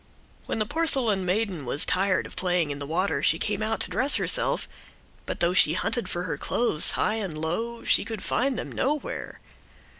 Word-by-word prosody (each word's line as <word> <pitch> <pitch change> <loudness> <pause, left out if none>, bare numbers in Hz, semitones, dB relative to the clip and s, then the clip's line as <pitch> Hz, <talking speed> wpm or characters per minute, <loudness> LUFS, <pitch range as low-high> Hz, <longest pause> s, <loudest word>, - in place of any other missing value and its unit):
When - - -2
the 215 - 0
porcelain 245 - +1
maiden 190 -4 -1
was 135 +4 -2
tired 185 +2 +2
of - - -11
playing 175 -4 0
in 140 - -5
the 140 - -6
water 180 +6 0
she - - +3
came 210 -1 -1
out 220 +1 -1
to - - -1
dress 275 +3 +3
herself, - - +2 0.6
but - - -4
though 175 +1 +2
she 155 -4 +5
hunted 235 +6 -2
for 175 - -3
her 180 - -4
clothes 230 -10 +2
high 215 - 0
and 180 -7 -5
low 225 +10 -3
she - - +3
could 225 -4 -6
find 260 -1 0
them - - -5
nowhere. 290 +2 -3
200 Hz, 190 wpm, -26 LUFS, 175-235 Hz, 0.6 s, she